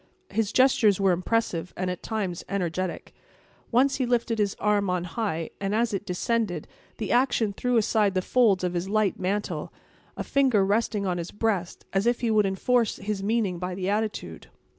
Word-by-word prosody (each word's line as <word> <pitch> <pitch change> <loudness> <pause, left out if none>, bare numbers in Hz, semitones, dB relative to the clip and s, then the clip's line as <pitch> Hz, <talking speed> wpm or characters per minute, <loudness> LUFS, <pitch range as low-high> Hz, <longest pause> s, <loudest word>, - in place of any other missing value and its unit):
His 215 -2 0
gestures 225 -6 +4
were 195 -1 +4
impressive, 180 -1 -1
and 185 0 -1
at 180 - -6
times 195 -6 -3
energetic. 185 -2 -3 0.6
Once 265 +3 +3
he 255 -2 0
lifted 235 -2 0
his 205 -2 +1
arm 205 -2 +1
on 180 -1 0
high; 175 -3 -3
and, 200 +1 -1
as 230 0 +1
it 200 +1 -3
descended, 180 -2 -1 0.3
the 215 - -3
action 240 -4 +2
threw 250 +4 0
aside 210 -2 +2
the 185 - +1
folds 215 -7 +3
of 180 -1 0
his 175 +2 -2
light 215 -2 +1
mantle, 200 +3 -2 0.5
a - - -2
finger 255 -8 +3
resting 210 0 0
on 180 -2 -1
his 170 - -5
breast, 205 -5 -2
as 195 +4 +1
if 240 0 +1
he 235 -2 +1
would 210 -2 +3
enforce 230 +4 +1
his 200 0 -4
meaning 200 -4 0
by 180 0 -3
the 185 0 -2
attitude. 210 - -3
205 Hz, 185 wpm, -26 LUFS, 185-225 Hz, 0.6 s, gestures